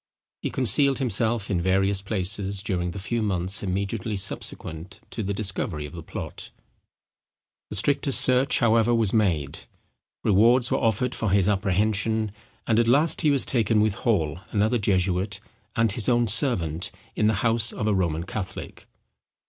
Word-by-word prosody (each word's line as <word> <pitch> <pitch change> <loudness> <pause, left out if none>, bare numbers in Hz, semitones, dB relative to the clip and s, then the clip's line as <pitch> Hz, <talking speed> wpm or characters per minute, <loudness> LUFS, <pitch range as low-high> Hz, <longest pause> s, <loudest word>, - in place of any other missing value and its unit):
He - - -2
concealed 135 +2 +3
himself 115 -3 0
in 90 -3 0
various 95 +2 +1
places 100 0 -2
during 90 -3 -2
the 85 - -7
few 105 +5 -2
months 95 -1 -1
immediately 100 +2 -3
subsequent 85 -2 -4
to 115 - -4
the 100 -1 -3
discovery 95 -6 -2
of 75 - -10
the 85 - -7
plot; - - -7 1.2
the - - -5
strictest 140 +5 +2
search, 130 +2 +3
however, 115 0 +3
was 110 -4 +2
made; 85 -11 0 0.6
rewards 115 +5 +4
were - - +1
offered 115 +3 0
for 110 - -2
his 95 0 +2
apprehension; 105 +2 0 0.3
and 115 -1 +2
at 120 - +2
last 145 +7 +3
he 155 - +3
was 140 -2 +3
taken 110 -3 +1
with 105 -1 +2
Hall, 90 - -1
another 110 +3 +1
jesuit, 95 -1 0 0.4
and 115 -2 +2
his 105 +2 -2
own 120 -1 +2
servant, 95 - +2 0.3
in 105 - +2
the 110 - +2
house 115 0 +2
of 105 - -4
a 105 - +2
Roman 85 -4 -1
Catholic. 95 +1 -7
105 Hz, 155 wpm, -24 LUFS, 95-115 Hz, 1.2 s, rewards